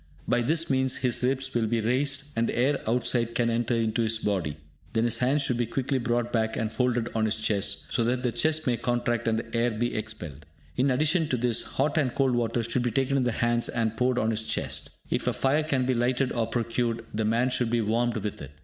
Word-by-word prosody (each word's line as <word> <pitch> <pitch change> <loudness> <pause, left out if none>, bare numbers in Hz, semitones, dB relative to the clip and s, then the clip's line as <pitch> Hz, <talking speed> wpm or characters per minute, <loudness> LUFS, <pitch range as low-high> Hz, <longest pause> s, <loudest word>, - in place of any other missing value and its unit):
By 120 - +2
this 160 +7 +1
means 130 -1 +2
his 125 -2 0
ribs 130 +1 0
will 115 -2 +1
be 115 +1 +1
raised, 135 +5 0
and 115 0 +1
the - - -3
air 135 +4 +2
outside 115 0 +1
can 115 -1 +2
enter 120 +1 0
into 115 0 0
his 110 0 +1
body; 95 -9 -1 0.4
then 115 0 +2
his 115 -1 0
hands 135 +3 +2
should 125 -3 0
be 120 - +1
quickly 135 +3 -1
brought 120 0 -1
back 110 -1 0
and 110 0 -2
folded 120 0 0
on 110 -1 +1
his 110 - +1
chest, 100 -2 -1
so 120 - +1
that 125 +2 0
the 125 - +1
chest 155 +4 +1
may 120 -2 +1
contract 120 0 -1
and 110 -1 +2
the 115 +1 -5
air 115 +1 +2
be 120 +2 -2
expelled. 85 -9 -6 0.3
In 130 +2 +2
addition 155 +5 +2
to 130 - +1
this, 120 -1 +1
hot 145 +4 0
and 130 -5 0
cold 135 -2 +2
water 120 0 0
should 115 +2 0
be 120 - +1
taken 135 +4 0
in 130 -2 +2
the 125 - +1
hands 120 +1 +1
and 115 -2 -1
poured 125 +2 +1
on 110 -2 +1
his 110 0 -3
chest. - - -2 0.2
If - - -1
a - - +2
fire 140 +3 +2
can 140 -5 0
be 130 - +2
lighted 125 +2 +1
or 115 -2 0
procured, 115 0 -1
the 110 +1 -1
man 120 +4 +2
should 125 -2 0
be 120 0 +1
warmed 115 +2 0
with 105 -1 -4
it. 70 - -7
120 Hz, 240 wpm, -27 LUFS, 115-130 Hz, 0.4 s, By